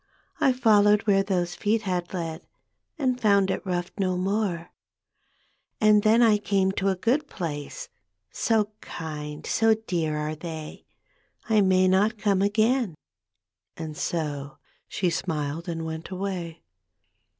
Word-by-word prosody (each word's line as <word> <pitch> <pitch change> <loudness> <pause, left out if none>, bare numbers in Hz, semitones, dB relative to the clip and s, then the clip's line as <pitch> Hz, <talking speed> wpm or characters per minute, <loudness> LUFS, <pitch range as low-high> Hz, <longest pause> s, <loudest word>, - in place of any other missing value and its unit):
I 265 - +4
followed 210 -4 +4
where 195 -2 +4
those 180 -3 -1
feet 215 +4 0
had 180 -3 -2
led, 165 -2 -5 0.5
And 255 -4 0
found 200 -3 +4
it - - -3
rough 175 -2 -2
no 185 -2 +1
more. 190 -3 -1 0.5
" - - -43
And 210 -1 +5
then 220 +3 +5
I 215 -2 +5
came 195 -2 +1
to 190 0 -1
a 190 - +1
good 255 +10 0
place, 150 - -5 0.4
So 215 -2 +1
kind, 150 -2 -7
so 225 0 +3
dear 160 -5 -1
are 150 +1 -2
they 160 -1 -8 0.6
I 220 -2 +4
may 185 -1 +4
not 205 +5 +3
come 200 -2 +1
again," 215 - +2 0.8
and 160 -2 -6
so 145 -4 -3 0.3
She 180 -3 -1
smiled 160 -1 -3
and 165 -1 -3
went 160 0 -6
away. 185 -3 -5
190 Hz, 140 wpm, -26 LUFS, 165-210 Hz, 0.8 s, And